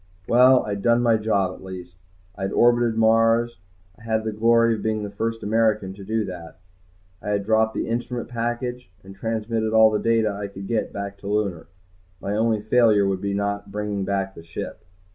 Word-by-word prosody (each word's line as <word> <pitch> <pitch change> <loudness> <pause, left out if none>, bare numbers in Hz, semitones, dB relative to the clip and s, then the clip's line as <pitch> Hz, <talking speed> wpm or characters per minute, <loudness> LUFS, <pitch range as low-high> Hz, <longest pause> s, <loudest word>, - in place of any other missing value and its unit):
Well, 125 +2 +6
I - - -6
had 100 -1 -3
done 120 +2 +3
my 115 -2 +4
job 100 -4 0
at - - -13
least. 90 -2 -9 0.4
I - - -11
had 95 0 -2
orbited 120 -1 +3
Mars, 115 0 +3 0.4
I - - -19
had 110 -1 -1
the 110 - -2
glory 115 +2 +3
of 110 - -4
being 110 -1 -1
the 100 - -5
first 115 +2 -3
American 105 -3 +1
to 100 0 -11
do 110 +1 -1
that. 85 -4 -9 0.6
I - - -5
had 100 -1 -1
dropped 110 0 +2
the - - -2
instrument 120 +1 -3
package 120 -1 -4
and 95 +1 -12
transmitted 110 +1 -2
all 110 0 +6
the 105 - 0
data 115 -2 +2
I 100 0 -5
could 100 0 -9
get 115 +2 -1
back 100 0 -6
to 100 - -9
Lunar. 100 -6 -1 0.5
My 100 +1 -3
only 110 0 +1
failure 110 -2 +4
would 95 -1 -1
be 100 - -2
in 100 - -1
not 100 0 -3
bringing 105 -1 -3
back 95 0 -2
the 85 - -12
ship. 80 - -7
110 Hz, 205 wpm, -23 LUFS, 100-115 Hz, 0.6 s, Well